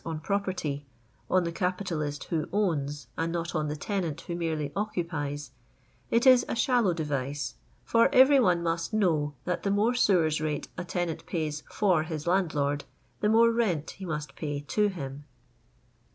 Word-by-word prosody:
on 160 -2 -4
property 180 -6 -2 0.2
— 120 - -36
on 185 -1 +3
the 170 - -2
capitalist 170 -5 -2
who 160 -3 -2
owns, 150 -8 -1
and 165 0 0
not 170 0 -3
on 155 -2 0
the 150 - -2
tenant 170 -2 -2
who 175 - -6
merely 160 -4 -2
occupies 160 -8 -3 0.3
— - - -36
^it 235 +2 +3
is 255 -2 +7
a - - -1
shallow 240 -5 +3
device, 145 -4 -2 0.3
for 230 +2 +4
every 270 +1 +7
one 180 -8 +3
must 165 +4 -1
know 165 -9 +2
that 180 -1 -1
the 200 - -1
more 205 +4 +3
aewers 170 -10 +3
rate 150 -2 -2
a 180 - -4
tenant 175 -2 -3
pays 155 -3 -2
for 185 -6 +2
his 155 -2 -5
landlord, 155 -6 +1 0.4
the 210 - +2
more 230 +1 +6
rent 195 -10 0
he 195 - -11
must 150 -4 -4
pay 145 -2 -3
to 210 +9 +1
him. 145 -7 -6
170 Hz, 170 wpm, -28 LUFS, 150-200 Hz, 0.4 s, is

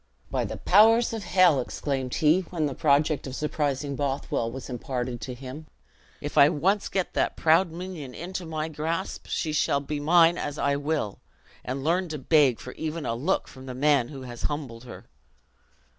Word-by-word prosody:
"By - - 0
the - - -5
powers 225 +5 +5
of 220 -2 -4
hell," 180 -5 +5
exclaimed 130 0 -3
he, 155 +3 +4
when 165 -4 -1
the 140 - -2
project 145 0 +2
of 130 - -6
surprising 145 -2 -2
Bothwell 135 -4 -1
was 130 +1 -7
imparted 125 -1 -4
to 125 - -5
him, 135 +5 -9 0.5
"if 145 - -1
I 140 - +8
once 190 +6 +1
get 190 -2 -2
that - - 0
proud 165 +3 +4
minion 170 -6 -7
into 180 +2 -5
my 155 -1 -3
grasp, 160 +4 -4
she 155 -2 -1
shall 140 -1 +2
be 145 +1 -4
mine 165 +3 +5
as 145 0 -4
I 140 -1 +1
will, 145 -7 -2 0.4
and 135 +2 -4
learn 175 +3 +1
to 155 - -4
beg 140 -3 +3
for 125 - -8
even 160 0 -4
a - - -1
look 145 +11 0
from 130 0 -12
the 130 - -6
man 140 -2 +3
who 135 -1 -9
has 120 -2 -8
humbled 130 -6 -6
her!" 120 - -10
150 Hz, 185 wpm, -26 LUFS, 130-165 Hz, 0.5 s, I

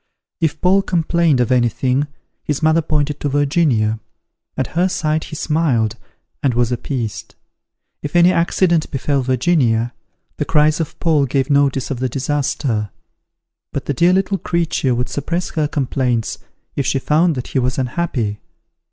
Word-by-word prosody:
If 160 -2 0
Paul 190 +2 +4
complained 170 -5 +1
of 120 - 0
anything, 125 +3 +1 0.4
his 150 0 -2
mother 160 +1 +4
pointed 150 -2 -1
to 145 - -1
Virginia: 140 -7 +1 0.6
at 130 - -2
her 180 +2 +3
sight 155 -2 -1
he - - -8
smiled, 150 -9 +1 0.5
and 130 -4 +1
was 120 0 +1
appeased. 120 -4 -4 0.7
If 145 +3 -6
any 175 +1 +6
accident 170 -1 +2
befel 140 0 0
Virginia, 125 -3 +1 0.4
the - - -1
cries 155 0 +3
of 160 - -4
Paul 155 -5 +2
gave 135 +2 0
notice 140 -2 +2
of 130 - -3
the 130 0 -1
disaster; 130 -5 -1 0.8
but 140 - -4
the 145 - -1
dear 170 +6 +4
little 195 +1 +1
creature 165 -7 0
would 125 +1 -1
suppress 165 +7 -3
her 155 -2 0
complaints 130 -5 -1 0.4
if 140 - 0
she - - +1
found 155 +4 +2
that 125 - -5
he - - 0
was 125 0 -1
unhappy. 125 -6 -2
145 Hz, 150 wpm, -19 LUFS, 125-160 Hz, 0.8 s, any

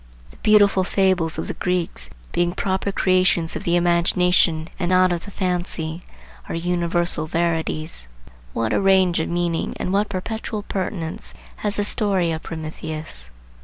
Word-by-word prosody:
The - - -18
beautiful 205 -3 +4
fables 185 -4 +1
of - - -3
the - - -3
Greeks, 175 - -1 0.2
being 175 0 +1
proper 190 +1 -1
creations 185 -3 +3
of - - -5
the 170 - +2
imagination 175 -1 +3
and 175 -2 0
not 185 0 +4
of 170 -1 -2
the - - -8
fancy, 175 -4 -2 0.5
are - - -2
universal 175 -1 0
verities. 160 - -1 0.4
What 115 - -1
a - - +2
range 190 -3 +4
of 160 - -1
meanings 170 -1 -1
and 185 - -2
what 205 +1 +2
perpetual 215 +2 -4
pertinence 180 -5 -4 0.2
has 210 -1 -2
the 205 - +1
story 195 -4 +1
of 160 0 -3
Prometheus! 155 - -6
175 Hz, 150 wpm, -22 LUFS, 165-190 Hz, 0.5 s, beautiful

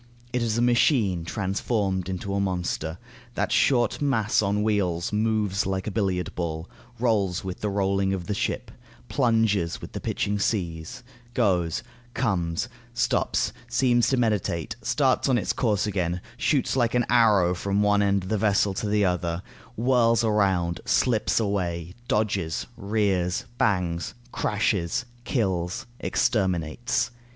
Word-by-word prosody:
It 125 - +1
is 115 -1 0
a 120 - +2
machine 115 - +3
transformed 95 -1 -1
into 95 +1 -3
a 100 - 0
monster. 90 -4 -2 0.4
That - - -1
short 125 -1 +2
mass 125 -5 +2
on 105 0 0
wheels 95 -5 0
moves 105 -3 +1
like 95 -1 -2
a 110 - -3
billiard 95 -4 -1
ball, 80 -1 -3 0.3
rolls 105 -7 +1
with 95 -1 -6
the 105 - 0
rolling 100 -1 +1
of 95 -3 -3
the 105 - -2
ship, 100 - -2 0.4
plunges 110 -9 +1
with - - -9
the - - -5
pitching 100 0 -1 1.0
goes, 90 -6 +1 0.3
comes, 90 -9 0 0.3
stops, - - +1
seems 120 0 +3
to 135 - +2
meditate, 110 -3 0
starts 135 -1 +2
on 130 - +4
its 110 - 0
course 105 -5 +1
again, 90 -4 -1 0.2
shoots 140 0 +1
like 120 -2 +1
an 120 -1 +3
arrow 105 -7 +4
from 100 +3 0
one 105 0 +3
end 100 -1 +2
of 95 - -7
the 110 - 0
vessel 100 -1 +2
to 105 - -3
the 105 -1 +3
other, 90 -1 -1 0.3
whirls 115 -1 +3
around, 95 -6 +1
slips 110 -4 +2
away, 90 -5 -2
dodges, 100 -6 0
rears, 100 -4 0
bangs, 90 -5 0 0.2
crashes, 105 -1 0 0.2
kills, 95 -6 -1
exterminates. 95 +3 0
100 Hz, 140 wpm, -25 LUFS, 90-115 Hz, 1.0 s, on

